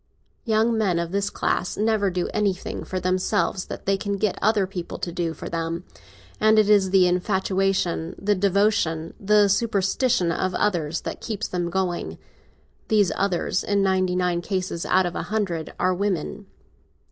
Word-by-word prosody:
Young 225 0 +2
men 200 -6 +1
of 170 0 -2
this 200 +1 0
class 180 - -1
never 215 -1 +2
do 180 -1 -2
anything 200 -3 -2
for 185 - -4
themselves 185 +1 0
that - - -7
they 195 0 +2
can 200 0 -2
get 205 -1 0
other 210 -2 +3
people 185 -2 -6
to 175 - -4
do 170 -1 -2
for - - -7
them, 165 +1 -3 0.6
and 215 0 +4
it 210 -1 +4
is 200 -2 +4
the 185 -1 +5
infatuation, 185 -2 0
the 205 +1 +1
devotion, 195 -4 +1
the 210 0 +4
superstition 200 -1 +1
of 185 +2 -1
others 170 -6 0
that - - -6
keeps 215 -4 -3
them 175 -1 -2
going. 180 -1 -2 0.7
These 210 -4 +3
others 190 -1 0
in 200 -1 +1
ninety 185 -1 +1
nine 180 -1 0
cases 185 -2 -3
out 185 0 +3
of 175 - -3
a - - -2
hundred 190 -7 -2
are 185 - +2
women. 195 +1 -2
190 Hz, 165 wpm, -24 LUFS, 180-205 Hz, 0.7 s, the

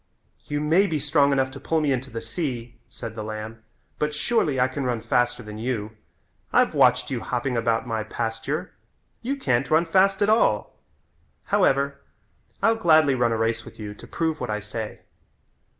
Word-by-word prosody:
"You 145 0 -2
may 165 +7 +4
be 160 -4 -1
strong 145 0 +3
enough 135 -1 +1
to 135 - -9
pull 160 +4 0
me 150 -2 +1
into 130 0 -2
the 115 -2 -5
sea," 120 -1 -4
said 115 -3 -7
the 110 -1 -5
lamb, 110 +1 -6 0.4
"but 150 0 0
surely 155 - +1
I 125 - +4
can 135 +1 -4
run 125 -2 0
faster 120 +1 0
than 105 0 -8
you. 110 -3 -2 0.6
I've - - +3
watched - - +4
you - - -1
hopping 125 +1 -2
about 115 0 +1
my 115 -2 -2
pasture. 115 +1 -3 0.5
You 270 +4 -1
can't 130 - 0
run 160 +2 +4
fast 195 +3 +3
at - - +3
all. 215 - +2 0.7
However, 140 +1 +2 0.6
I'll 225 +1 +4
gladly 155 -7 +5
run 120 -2 +2
a 115 - 0
race 115 0 0
with - - -13
you 105 -1 -6
to - - -13
prove 160 -2 -1
what 125 - -3
I 105 0 -1
say." 105 +1 -6
130 Hz, 180 wpm, -24 LUFS, 115-150 Hz, 0.7 s, gladly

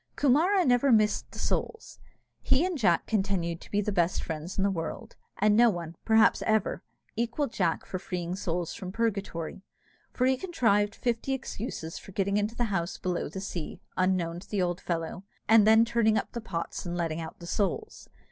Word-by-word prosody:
Coomara 335 +8 +3
never 250 +2 +4
missed 215 -2 +3
the - - -12
souls. 450 - -3 0.4
He 275 +6 +3
and 365 -1 -1
Jack 200 - +2
continued 190 -5 -1
the 205 0 0
best 175 -2 +1
friends 160 +2 -5
in 195 - +2
the 200 - +2
world, 165 -3 -5 0.2
and 210 +1 +4
no 235 +1 +6
one, 170 -4 -4
perhaps, 225 0 +5
ever 220 -2 +1 0.3
equalled 235 +4 -1
Jack 170 -4 0
for 185 - -4
freeing 180 -1 -4
souls 175 -3 -2
from 185 -4 -6
purgatory; 200 -6 -2 0.5
for 255 - 0
he 260 0 +3
contrived 210 - +1
fifty 240 +2 -1
excuses 220 -10 -5
for 195 - -13
getting 200 +1 +1
into 210 +2 -1
the 240 - 0
house 170 -1 -1
below 180 -4 -2
the 190 - -6
sea, 175 -5 -5 0.2
unknown 180 -2 +1
to 180 - -15
the 205 - -1
old 175 -1 0
fellow, 170 +2 -3 0.2
and 220 -1 +6
then 220 +1 +7
turning 230 -2 +2
up - - -2
the 235 - -5
pots 170 -6 -4
and 175 -1 -4
letting 165 -1 -1
out 160 - -7
the 170 - -10
souls. 210 - -2
200 Hz, 185 wpm, -28 LUFS, 175-230 Hz, 0.5 s, then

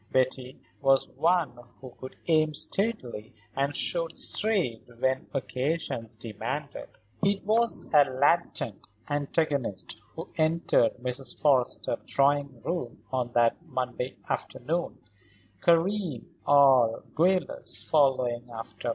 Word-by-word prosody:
Betty 130 0 0 0.2
was 135 0 +3
one 165 -7 +1 0.2
who 130 -1 -10
could 130 - -9
aim 155 -2 +2
steadily 145 - -2 0.2
and 140 +1 0
shoot 165 -2 -1
straight 190 - 0 0.2
when 130 +1 0
occasion 130 -2 -2
demanded. 115 +6 -5 0.3
It 200 0 +1
was 230 +2 +3
a 145 -2 +7
latent 135 - 0 0.3
antagonist 140 - -1
who 165 +2 -7
entered 160 -6 +2
Mrs. 125 +2 -5
Forrester's 135 -5 +2
drawing 140 -3 +1
room 170 -9 -4
on 125 -2 -1
that 120 -1 +2
Monday 125 0 -4
afternoon, 155 +7 -3 0.6
Karen, 170 - +2 0.2
all 135 -5 +5
guileless, 180 +2 0
following 130 -5 +2
after. 115 +1 -6
140 Hz, 105 wpm, -28 LUFS, 125-165 Hz, 0.6 s, a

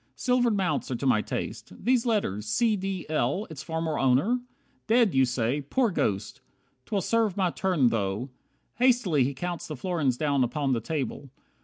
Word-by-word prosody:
Silvered 245 -4 +2
mounts 170 -7 -1
Are 130 - -1
to 130 - -4
my 120 -5 +4
taste. - - -5
These 250 0 +1
letters 110 - 0
`C. 220 - +2
D. 190 -2 -3
L.' 155 - 0
Its 150 -2 -7
former 160 -1 -2
owner? 135 - +3 0.5
Dead, 230 -3 +4
you 135 0 +4
say. 125 +3 -1
Poor 230 - +1
Ghost! 100 - -2 0.5
'Twill 200 -2 0
serve 220 -2 +1
my 185 -3 +2
turn 170 -11 +2
though 110 +4 -2 0.2
" - - -44
Hastily 240 - +3
he 135 +2 -2
counts 175 +3 -4
The 155 - -5
florins 145 -6 0
down 140 -3 +1
upon 135 +2 0
the 115 - 0
table. 140 0 -4
155 Hz, 175 wpm, -27 LUFS, 130-205 Hz, 0.5 s, my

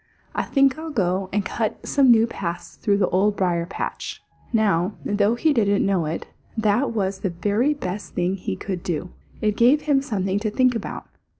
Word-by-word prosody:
"I - - 0
think 275 +1 +2
I'll 320 0 -5
go 190 - 0
and 205 0 0
cut 220 +2 -3
some 275 -3 +4
new 225 -1 +6
paths 175 -6 -5
through 205 -3 +1
the 190 -3 +2
Old 200 +3 +2
Briar 175 -3 0
patch." 195 - -5 0.3
Now, 205 -4 +2
though 205 +2 +2
he 305 +5 +2
didn't 205 -5 +2
know 190 -5 +1
it, 160 - -3 0.3
that 220 +4 +2
was 195 -3 -1
the 195 - -1
very 205 - +1
best 200 -6 -5
thing 180 +1 +1
he 180 - -4
could 185 - -4
do. 175 +1 -3 0.3
It 210 -1 +1
gave 255 +7 +5
him 285 -3 +3
something 200 -7 -1
to 215 +1 -1
think 255 +3 +3
about. 225 -3 -5
205 Hz, 190 wpm, -23 LUFS, 185-235 Hz, 0.3 s, new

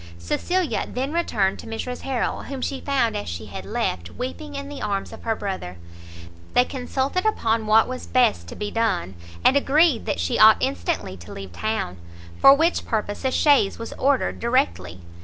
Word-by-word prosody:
Cecilia 335 - -1
then 265 +4 -3
returned 215 - 0
to - - -9
Mrs 235 +3 -5
Harrel, 265 -3 -2
whom 275 -1 -6
she 270 +1 -3
found 260 -6 +1
as 205 - -4
she 85 -1 -5
had - - -8
left, 85 -1 -2
weeping 285 - -6
in 280 0 -5
the 285 -1 -8
arms 200 -2 -2
of - - -10
her 225 -1 +1
brother. 190 - -5 0.8
They 245 - +5
consulted 270 +6 -2
upon 225 - 0
what 220 +1 +5
was 255 0 -6
best 95 - +2
to - - -8
be 205 0 -4
done, 225 - 0 0.3
and 265 - +6
agreed 280 -1 +3
that - - -1
she 85 - 0
ought - - +8
instantly 90 +1 -2
to 85 0 -12
leave 95 -3 -8
town; 215 - -2 0.4
for 275 - +9
which 330 +4 +1
purpose 210 -1 -3
a 260 - +2
chaise 280 -8 +3
was 230 - -6
ordered 275 0 +1
directly. 90 - 0
230 Hz, 180 wpm, -23 LUFS, 190-275 Hz, 0.8 s, for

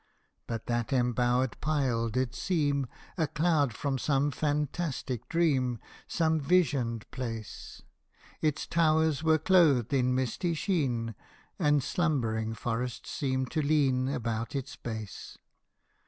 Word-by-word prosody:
But 115 -1 -4
that 120 -2 -1
embowered 125 0 +1
pile 130 -7 +1
did 125 +2 -1
seem 145 -4 0 0.3
A 160 - +2
cloud 155 -3 +2
from 135 +4 -2
some 145 +1 +1
fantastic 145 -3 -2
dream 135 -8 +2 0.3
Some 160 -1 +1
visioned 135 -8 +1
place: 115 -5 -6 0.6
Its 155 -2 0
towers 160 -2 +2
were 160 0 +4
clothed 155 - +4
in 125 -1 +2
misty 130 +7 -1
sheen, 135 - 0 0.5
And 145 -2 +3
slumbering 115 -11 0
forests 120 +1 -3
seemed 130 -3 -1
to 155 - 0
lean 135 -3 +2
About 115 -2 -2
its 135 -2 -4
base. 110 -4 -7
135 Hz, 115 wpm, -29 LUFS, 120-155 Hz, 0.6 s, were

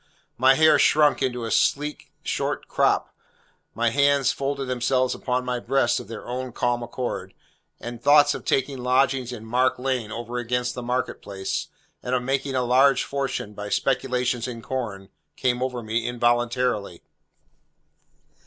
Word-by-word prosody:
My 130 +2 +5
hair 155 +2 +5
shrunk 150 -2 +4
into 125 -3 -1
a 115 - -4
sleek 150 +1 0
short - - -2
crop, - - +1 0.6
my 115 0 +1
hands 140 0 +3
folded 140 0 -3
themselves 125 0 +1
upon 125 0 -2
my 125 -1 -1
breast 120 -1 +1
of - - -9
their 115 -2 -8
own 125 0 -5
calm 120 0 0
accord, 120 +1 -5 0.4
and 120 0 -7
thoughts 145 +1 +6
of - - -7
taking 135 0 0
lodgings 130 0 +1
in 110 -3 -8
Mark 125 +3 +1
Lane 125 -4 -2
over 120 +2 -4
against 125 0 -1
the 125 - -6
Market 125 +1 -2
Place, 95 -1 -4 0.3
and 125 +1 -1
of 125 - -1
making 135 +1 -1
a 130 - +1
large 130 +3 +4
fortune 135 -6 -3
by 105 0 -6
speculations 125 -1 0
in 115 -2 -7
corn, 100 -5 -4 0.3
came 125 -1 0
over 125 -2 -2
me 115 +2 -1
involuntarily. 120 -5 0
125 Hz, 155 wpm, -24 LUFS, 120-135 Hz, 0.6 s, thoughts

